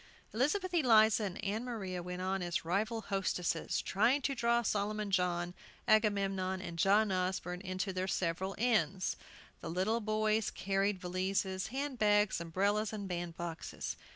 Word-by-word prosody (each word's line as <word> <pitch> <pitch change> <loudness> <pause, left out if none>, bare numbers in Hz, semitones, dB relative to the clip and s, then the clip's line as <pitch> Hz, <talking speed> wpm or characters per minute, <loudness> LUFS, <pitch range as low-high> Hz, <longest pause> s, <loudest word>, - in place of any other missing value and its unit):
Elizabeth 350 - 0
Eliza 220 -8 +5
and 200 +2 -5
Ann 210 +4 -1
Maria 195 -7 -4
went 180 +1 -5
on 190 0 -1
as 175 -2 -2
rival 215 +6 0
hostesses, 185 -5 -1
trying 230 +8 +3
to 275 - +1
draw 235 -1 +2
Solomon 210 0 -1
John, 175 -1 +1 0.3
Agamemnon, 195 -3 +2
and 170 -2 -7
John 205 +3 +4
Osborne 180 -1 -1
into 185 0 -3
their 185 +1 -2
several 190 +1 -1
inns. 195 -6 +1 0.4
The - - -6
little 190 +7 +1
boys 215 0 +1
carried 195 +1 0
valises, 190 +1 -1
hand 270 +1 -4
bags, 210 -3 +3
umbrellas, 200 +5 0
and 205 -2 -5
bandboxes. 170 -2 -4
195 Hz, 140 wpm, -33 LUFS, 185-215 Hz, 0.4 s, Eliza